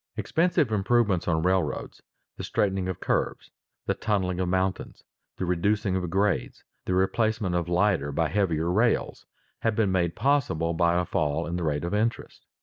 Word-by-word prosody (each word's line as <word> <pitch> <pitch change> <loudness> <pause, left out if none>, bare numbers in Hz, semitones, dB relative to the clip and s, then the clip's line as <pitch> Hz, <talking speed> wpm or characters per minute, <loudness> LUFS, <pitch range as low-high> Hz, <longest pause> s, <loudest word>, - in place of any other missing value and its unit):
Expensive 165 -6 +1
improvements 105 -2 +1
on 80 -2 +1
railroads, 95 0 -1 0.3
the - - -7
straightening 95 -2 0
of 95 - -4
curves, - - -2 0.3
the - - +1
tunneling 95 -4 -1
of 90 -1 0
mountains, 95 +1 -2 0.3
the 95 - -2
reducing 95 +2 0
of 90 -2 -2
grades, 95 -5 -1 0.2
the 90 - 0
replacement 110 +1 +1
of 85 -1 -1
lighter 90 -6 +1
by 80 +3 +1
heavier 85 -3 0
rails, 110 +5 0 0.3
have 115 -1 0
been 105 -3 +2
made 85 -3 0
possible 120 - +1
by 85 +1 +2
a 90 - -1
fall 80 -1 -1
in 85 - -4
the 90 - -2
rate 75 -1 -1
of 85 - -3
interest. 110 +3 -2
95 Hz, 165 wpm, -26 LUFS, 85-105 Hz, 0.3 s, been